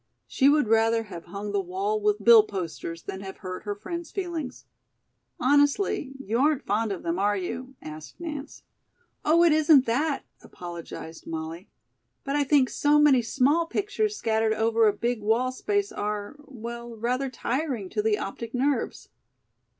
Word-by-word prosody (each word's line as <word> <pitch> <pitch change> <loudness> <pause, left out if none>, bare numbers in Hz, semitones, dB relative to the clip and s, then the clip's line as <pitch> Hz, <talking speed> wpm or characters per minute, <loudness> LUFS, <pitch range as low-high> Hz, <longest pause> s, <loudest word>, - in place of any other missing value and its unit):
She 275 0 +3
would 295 -4 +3
rather 225 +1 +3
have 180 -6 -9
hung 200 +4 -6
the 200 -1 +1
wall 195 +4 -2
with 210 0 +1
bill 230 -1 +9
posters 170 -4 -6
than 190 - -6
have 190 -1 -8
hurt 185 +1 -7
her 205 -1 -2
friend's 340 - -6
feelings. 340 -8 -5 0.7
"Honestly, 290 +1 +2
you 230 -2 -2
aren't 290 0 +2
fond 215 +2 0
of 190 - -5
them, 170 +2 -1
are 205 +1 +2
you?" 250 +8 -5
asked 155 - -9
Nance. 300 -4 -7 0.6
"Oh, 330 +3 +5
it 340 - +6
isn't 300 -3 +5
that," 275 +4 0 0.2
apologized 170 -2 -9
Molly. 165 +3 -6 0.5
"But 275 0 -2
I 290 - +3
think 275 -2 +3
so 295 +1 +3
many 295 -4 +5
small 280 +8 +2
pictures 415 +3 -1
scattered 220 -1 +1
over 225 0 +3
a - - +5
big 235 +1 -2
wall 230 +5 +1
space 405 +9 -1
are 210 - -4
well, 235 -2 -8
rather 250 +4 -1
tiring 255 -3 -2
to 210 - -1
the 210 -1 +2
optic 230 +4 -6
nerves." 275 +3 -1
235 Hz, 160 wpm, -26 LUFS, 205-285 Hz, 0.7 s, bill